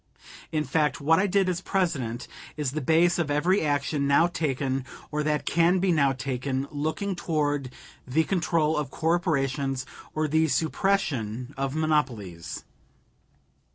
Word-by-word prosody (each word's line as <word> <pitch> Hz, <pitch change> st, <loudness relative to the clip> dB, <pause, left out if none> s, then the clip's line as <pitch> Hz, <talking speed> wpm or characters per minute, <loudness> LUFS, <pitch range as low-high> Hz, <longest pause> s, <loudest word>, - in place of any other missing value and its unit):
In 155 Hz, -1 st, 0 dB
fact, 150 Hz, 0 st, +1 dB
what 160 Hz, +4 st, +4 dB
I 200 Hz, -, +2 dB
did 195 Hz, 0 st, +2 dB
as 180 Hz, -1 st, -1 dB
President 140 Hz, -13 st, -1 dB, 0.3 s
is 145 Hz, -4 st, -1 dB
the 155 Hz, +2 st, -3 dB
base 165 Hz, +5 st, +3 dB
of 160 Hz, -4 st, 0 dB
every 170 Hz, +7 st, +2 dB
action 145 Hz, -1 st, 0 dB
now 140 Hz, +4 st, +5 dB
taken 135 Hz, -5 st, -1 dB, 0.3 s
or 150 Hz, 0 st, -1 dB
that 150 Hz, 0 st, 0 dB
can 170 Hz, +2 st, +3 dB
be 185 Hz, 0 st, +2 dB
now 140 Hz, -4 st, +3 dB
taken 130 Hz, +1 st, -2 dB
looking 155 Hz, +7 st, -2 dB
toward 145 Hz, -5 st, -1 dB, 0.4 s
the 150 Hz, +6 st, +2 dB
control 160 Hz, -3 st, +1 dB
of 150 Hz, -3 st, -2 dB
corporations, 140 Hz, -5 st, 0 dB, 0.3 s
or 155 Hz, 0 st, +1 dB
the 160 Hz, +2 st, +3 dB
suppression 140 Hz, -, 0 dB
of 135 Hz, +1 st, -2 dB
monopolies. 125 Hz, -, -1 dB
150 Hz, 140 wpm, -26 LUFS, 135-165 Hz, 0.4 s, now